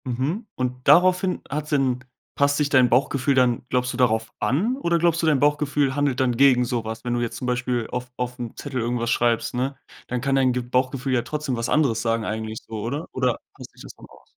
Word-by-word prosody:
Mhm, 135 - -2
und 125 0 -4
daraufhin 180 +4 +4
hat’s 150 +2 -4
denn 135 -4 +1 0.3
passt 140 0 +2
sich 150 -1 +1
dein 130 -3 +5
Bauchgefühl 135 +2 +2
dann 125 -2 +2
glaubst 125 0 0
du, - - -6
darauf 115 -3 +1
an 160 - +1
oder 170 -10 +1
glaubst 170 0 +2
du, 165 - +1
dein 150 -3 +3
Bauchgefühl 145 -1 +1
handelt 145 -3 0
dann 125 -2 +1
gegen 130 -2 +5
so 120 -1 -2
was? 110 0 -6
Wenn 120 - -1
du 120 - 0
jetzt 120 -1 -3
zum 130 - -5
Beispiel 125 -1 -1
auf 125 0 -4
auf 125 0 -4
’m 120 -2 -6
Zettel 135 -4 -4
irgendwas 120 0 -1
schreibst, 115 -1 +1
ne, 130 +2 -2 0.3
dann 125 -1 -3
kann 135 +1 0
dein 130 -2 +3
g 125 - -1
Bauchgefühl 130 +2 -1
ja 120 - +2
trotzdem 145 +2 -3
was 115 0 -3
anderes 130 -8 +2
sagen 115 -1 0
eigentlich 110 0 -4
so, 110 -2 -6
oder? 140 +9 -3
Oder 125 -2 0 0.2
gleicht - - -12
sich - - -16
das - - -9
dann - - -14
aus? - - -19
125 Hz, 230 wpm, -23 LUFS, 120-145 Hz, 0.3 s, dein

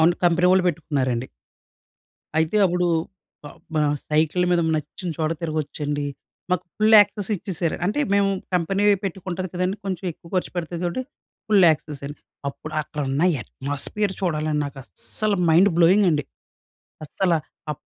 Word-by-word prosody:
అవును. 165 +2 +5
కంపెనీ 175 +1 +4
వాళ్ళు 185 0 +4
పెట్టుకున్నారండి. 135 -7 -1 1.1
అయితే 160 +5 +1
అప్పుడు 180 0 +1 0.6
బ - - -7 0.3
బ - - +2 0.3
సైకిల్ 155 +3 +2
మీద 175 -1 +3 0.2
నచ్చిన 155 +4 -5
చోట 155 -1 0
తిరగొచ్చండి. 150 -2 -2 0.5
మాకు 180 - +1
ఫుల్ 215 +1 +5
యాక్సెస్ 205 -1 0
ఇచ్చేసారు. 170 -3 -2
అంటే 210 +10 0 0.2
మేము 200 -1 +3 0.2
కంపెనీ 195 +4 +1 0.2
పెట్టుకుంటది 185 0 -4
కదండీ 180 +2 -1
కొంచెం 190 -1 -3
ఎక్కువ 170 - -17
ఖర్చు 185 - 0
పెడుతది 170 0 -3
కాబట్టి 175 +9 -1 0.5
ఫుల్ 200 -3 +6
యాక్సెస్ 150 -2 -3
అండి. 145 +1 -9 0.3
అప్పుడు 155 +2 -8
అక్కడ 150 0 -7
ఉన్న 140 +4 0 0.2
అట్మాస్ఫియర్ 145 - -3
చూడాలని 155 -4 0
నాకస్సల 145 - -3 0.2
మైండ్ 185 +5 +6
బ్లోయింగ్ 185 +4 +5
అండి. 150 -2 0 0.8
అస్సల 180 +4 0 0.4
ఆ - - +1
170 Hz, 140 wpm, -23 LUFS, 150-190 Hz, 1.1 s, ఫుల్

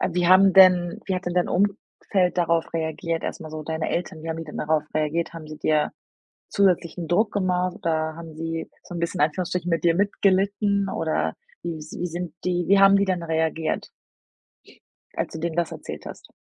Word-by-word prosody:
äh, - - +1
wie 180 0 +1
haben 190 +1 +7
denn 180 -2 +6
wie 190 - 0
hat 180 0 -4
denn 175 - -2
dein 180 - +2
Umfeld 195 -1 0
darauf 170 -1 +1
reagiert 165 0 -2
erst - - -4
mal 155 - -8
so 155 0 -6
deine 160 +1 -3
Eltern, 165 -2 -3
wie 165 - -6
haben 160 - -4
die 165 - -5
denn 150 - -9
darauf 155 0 +1
reagiert? 155 +2 0
Haben 160 -2 -8
sie 155 - -9
dir 150 -1 +1 0.6
zusätzlichen 175 -3 +1
Druck 210 +6 +2
gemacht 185 -2 0
oder 160 -1 -1
haben 165 -2 -9
sie 165 0 -4
so - - -10
'n 170 - -3
bisschen 170 0 -2
in 150 - +6
Anführungsstrichen 180 +2 -3
mit 165 +1 0
dir 170 - +4
mitgelitten? 200 0 +1
Oder 160 -4 -1 0.3
wie 170 -1 -4
wie 155 +3 -5
sind 175 0 -5
die 175 -1 0
wie 200 +1 +6
haben 195 0 +7
die 200 - +3
denn 185 -3 -1
reagiert 160 -1 -1 1.3
als - - -3
du 160 - -5
denen 165 0 -3
das 170 -1 0
erzählt - - -8
hast? - - -10
170 Hz, 200 wpm, -24 LUFS, 160-185 Hz, 1.3 s, haben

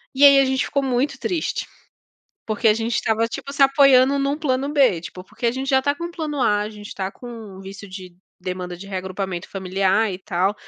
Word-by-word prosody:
E 280 +2 +6
aí 280 -1 +8
a 275 - +4
gente 265 0 0
ficou 280 0 -1
muito 270 +2 0
triste, 340 -4 -2 0.8
porque 220 +1 0
a 215 - +6
gente 225 +1 -2
estava, 225 +1 +1
tipo, 275 +4 -7
se 280 - +4
apoiando 275 0 +5
num 280 +2 0
plano 270 -3 0
B, 260 - +3
tipo, 180 +2 -9
porque 215 - -7
a - - +3
gente 265 +2 -4
já 265 -1 +4
está 285 +2 0
com 340 +3 -5
o 345 - -6
plano 305 -5 -3
A, 210 -4 +3
a 210 - -3
gente 210 -1 -10
tá 190 -1 -3
com 245 - -12
um 215 -5 -10
visto 195 +1 -9
de 185 -1 -9 0.3
demanda 180 -1 -5
de 195 +3 -10
reagrupamento 190 -1 -4
familiar 195 +2 +1
e 180 - -5
tal. 190 +1 0
225 Hz, 225 wpm, -22 LUFS, 190-275 Hz, 0.8 s, aí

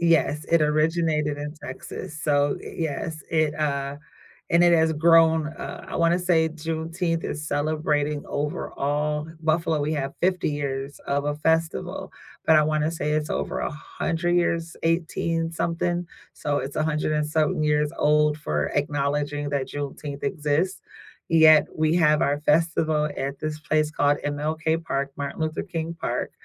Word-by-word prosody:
Yes, 165 -3 +2
it 165 -2 +5
originated 155 -1 +1
in 150 +1 -5
Texas, 150 +4 -7
so 145 -1 +2
y - - -9
yes, 155 0 -3
it, 155 -2 +2
uh 140 -2 -1 0.6
and, 170 +1 +5
it 175 0 +6
has 160 -1 +4
grown 160 0 +5
uh, - - -8
I - - -6
wanna 170 +1 +3
say 165 -3 +2
Juneteenth 165 +2 -2
is 150 +1 -4
celebrating, 150 -1 0
overall 150 +1 -2
Buffalo, 160 0 +1
we 150 +2 0
have 140 -2 -2
50 185 -3 +1
years 140 -1 -4
of 140 +1 0
a 145 0 0
festival, 160 +1 -1 0.3
but 160 - +6
I 155 - +6
wanna 155 0 +1
say 150 -2 -2
it's 155 0 -1
over - - -2
100 165 +3 -2
years 170 -1 0
18 165 0 0
something? 170 +1 -1 0.3
So, 145 -1 -1
it's 135 - -5
100 155 0 0
and 150 0 0
something 155 -1 +1
years 150 0 +2
old 150 0 +3
for 75 - -1
acknowledging 145 0 -1
that 140 -2 -1
Juneteenth 145 0 -5
exists, 175 0 0 0.5
yet 160 -1 +7
we 155 +1 +2
have 150 -2 +4
our 145 +1 +1
festival 155 -1 +2
at 140 +1 -3
this 155 0 -3
place 155 0 +1
called 145 -1 +2
MLK 155 +3 -1
Park 140 -3 -2
Martin 140 0 -4
Luther 155 0 -1
King 165 -3 -4
Park, - - -2
155 Hz, 150 wpm, -25 LUFS, 145-165 Hz, 0.6 s, yet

